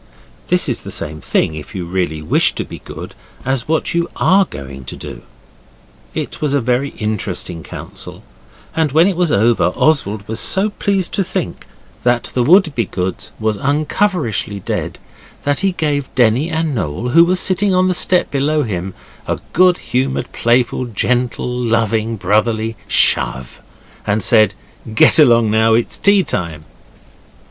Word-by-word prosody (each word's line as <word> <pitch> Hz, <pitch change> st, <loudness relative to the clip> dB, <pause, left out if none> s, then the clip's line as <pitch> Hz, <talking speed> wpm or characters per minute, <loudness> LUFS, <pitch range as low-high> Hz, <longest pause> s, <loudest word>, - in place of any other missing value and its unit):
This -, -, +2 dB
is -, -, -1 dB
the -, -, -9 dB
same 75 Hz, 0 st, -3 dB
thing, 80 Hz, -, 0 dB
if 75 Hz, +4 st, -9 dB
you 90 Hz, -2 st, -4 dB
really 85 Hz, -3 st, -2 dB
wish -, -, +3 dB
to -, -, -3 dB
be -, -, -10 dB
good, -, -, -9 dB, 0.3 s
as 130 Hz, -2 st, -1 dB
what 160 Hz, 0 st, 0 dB
you 170 Hz, 0 st, 0 dB
are 195 Hz, +1 st, +3 dB
going 70 Hz, -, -9 dB
to -, -, -6 dB
do. -, -, -9 dB, 0.9 s
It -, -, -5 dB
was 145 Hz, -2 st, +1 dB
a -, -, +3 dB
very 125 Hz, +3 st, 0 dB
interesting 100 Hz, -5 st, -3 dB
council, -, -, -8 dB, 0.5 s
and 160 Hz, -4 st, 0 dB
when 160 Hz, +3 st, +5 dB
it 195 Hz, -1 st, +1 dB
was 175 Hz, -2 st, +1 dB
over 115 Hz, -1 st, +3 dB
Oswald 105 Hz, -10 st, +1 dB
was 110 Hz, -, -2 dB
so 200 Hz, +3 st, +3 dB
pleased 195 Hz, -3 st, -1 dB
to 195 Hz, -, +1 dB
think -, -, -4 dB, 0.3 s
that 120 Hz, -1 st, 0 dB
the 125 Hz, -, +1 dB
Wouldbegoods 120 Hz, -, +1 dB
was 110 Hz, -1 st, -1 dB
unrecoverishly 145 Hz, -, -1 dB
dead -, -, -4 dB, 0.5 s
that 145 Hz, -1 st, 0 dB
he 195 Hz, -1 st, +1 dB
gave 145 Hz, -5 st, -2 dB
Denny 125 Hz, +5 st, +2 dB
and 160 Hz, -2 st, -1 dB
Noel, 110 Hz, -, -3 dB
who 165 Hz, +7 st, +6 dB
were 180 Hz, +2 st, +2 dB
sitting 185 Hz, +1 st, +2 dB
on 185 Hz, 0 st, +3 dB
the 185 Hz, -, +1 dB
step 180 Hz, 0 st, +2 dB
below 150 Hz, +2 st, +1 dB
him, 95 Hz, -5 st, -4 dB, 0.3 s
a -, -, -1 dB, 0.2 s
good 180 Hz, 0 st, +4 dB
humoured, 130 Hz, +2 st, -2 dB
playful, 120 Hz, +1 st, +1 dB
gentle, 120 Hz, +2 st, -1 dB
loving, 115 Hz, -2 st, 0 dB
brotherly 110 Hz, +3 st, 0 dB
shove, 65 Hz, -1 st, +2 dB, 0.5 s
and 105 Hz, 0 st, +1 dB
said, 110 Hz, -4 st, +4 dB, 0.4 s
'Get 120 Hz, -, +6 dB
along 120 Hz, -6 st, +5 dB
down, 110 Hz, +1 st, +3 dB
it's 120 Hz, -, -1 dB
tea 200 Hz, -1 st, +4 dB
time! 85 Hz, -, -4 dB
120 Hz, 155 wpm, -17 LUFS, 105-160 Hz, 0.9 s, who